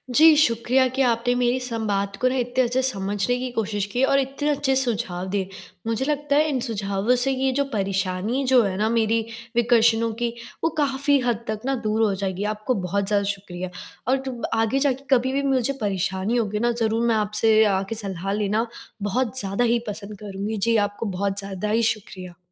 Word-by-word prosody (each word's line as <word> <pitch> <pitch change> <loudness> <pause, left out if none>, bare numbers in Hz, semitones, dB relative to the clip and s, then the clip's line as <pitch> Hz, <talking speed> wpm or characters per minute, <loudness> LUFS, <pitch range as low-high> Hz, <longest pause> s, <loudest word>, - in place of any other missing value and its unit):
जी, 315 +2 +8
शुक्रिया 255 -1 +3
कि 260 +2 -2
आपने 245 -1 +2
मेरी 245 +1 +1
संवाद 210 -5 -2
को 255 - +1
ना 260 - -2
इतने 245 +1 +1
अच्छे 250 +2 +1
समझने 205 -1 0
की 255 0 -3
कोशिश 210 -3 -1
की 250 - +1
और 275 +1 +4
इतने 275 +2 -2
अच्छे 280 -2 +1
सुझाव 220 -8 -1
दिए। 195 -1 -2 0.4
मुझे 230 +4 0
लगता 290 -1 0
है 305 +1 +4
इन 265 -3 0
सुझावों 205 +1 0
से 270 - +1
ये 265 0 +1
जो 280 +2 +1
परेशानी 195 +5 -1
जो 255 -2 +6
है 195 -3 -1
ना 215 +2 +1
मेरी 230 0 +2 0.4
विकर्षणों 230 -1 +3
की, 235 -1 0 0.3
वो 330 - +3
काफ़ी 280 -1 +2
हद 235 -1 0
तक 215 -1 -2
ना 270 0 +1
दूर 215 +1 0
हो 210 -2 +2
जाएगी। 190 0 -3
आपको 215 +4 -2
बहुत 200 +2 -1
ज़्यादा 205 -1 +2
शुक्रिया। 185 -2 -7 0.4
और 265 - +3
तुम 250 -3 -5 0.2
आगे 225 +4 +1
जाके 275 -1 0
कभी 260 +2 0
भी 280 - +1
मुझे 265 0 +1
परेशानी 195 +3 -1
होगी 210 -2 -1
ना 240 +1 +2
ज़रूर 230 0 0
मैं 230 - +3
आपसे 215 +1 +3
आके 195 +4 -2
सलाह 195 -2 -4
लेना 210 +2 0 0.4
बहुत 245 +4 +1
ज़्यादा 195 +3 0
ही 240 - +2
पसंद 205 0 -6
करूँगी। 205 +1 -4
जी 230 +3 +2
आपको 205 +3 -7
बहुत 200 0 0
ज़्यादा 195 +1 -4
ही 230 +2 +2
शुक्रिया। 185 -4 -11
225 Hz, 195 wpm, -23 LUFS, 200-255 Hz, 0.4 s, जी